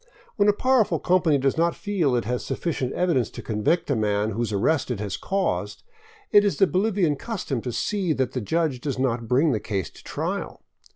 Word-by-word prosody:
When 205 -1 +3
a - - +5
powerful 255 -1 +2
company 175 -5 +2
does 135 +3 0
not 170 0 +2
feel 180 -11 0
it 120 - 0
has 125 +1 -2
sufficient 135 -7 -2
evidence 165 - +1
to - - -9
convict 115 +11 0
a - - +2
man 105 -1 0
whose 115 +1 -2
arrest 130 +10 +1
it 120 -5 -2
has 100 -2 -3
caused, 195 0 -2 0.5
it 205 - +7
is 205 - 0
the 195 - +5
Bolivian 185 -5 +1
custom 150 - -4
to 125 - -4
see 190 - -1
that 130 -3 -1
the 125 - -3
judge 155 +2 -1
does 140 -2 -3
not 120 -3 -1
bring 140 +7 +3
the 110 - 0
case 100 -3 -3
to - - -16
trial. - - -4
140 Hz, 205 wpm, -24 LUFS, 120-185 Hz, 0.5 s, it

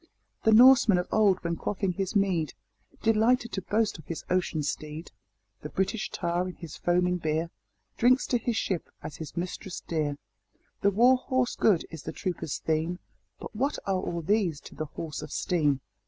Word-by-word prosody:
The 220 - +6
Norseman 235 -3 +7
of 180 - -1
old, 200 -4 +3
when 170 0 -1
quaffing 195 +1 -2
his 195 +2 -3
mead, 185 -6 +1 0.5
Delighted 230 +2 +3
to 195 - -3
boast 210 -1 0
of 155 - -14
his 165 - -5
"ocean 175 -4 0
steed;" 155 +2 -5 0.5
The 150 - -6
British 195 +5 -1
tar, 175 +1 -1
in 180 - -9
his 165 -4 -9
foaming 180 +1 +1
beer, 160 0 -1 0.5
Drinks 255 +2 +4
to 245 - +2
his 230 0 -1
ship 185 -6 -2
as 145 - -7
his 160 0 -8
mistress 180 +1 -4
dear. 150 -3 -1 0.6
The 200 - +4
war 240 +6 +5
horse 255 -1 0
good 195 -7 +3
is 160 -3 -7
the - - -6
trooper's 175 -5 -3
theme 160 +3 -1 0.4
But - - -9
what 275 +6 0
are 190 -2 0
all 170 -1 -3
these 185 -5 +1
to - - -12
the 155 - -4
horse 150 0 -6
of 150 - -8
steam? 150 -6 +1
180 Hz, 180 wpm, -28 LUFS, 160-215 Hz, 0.6 s, Norseman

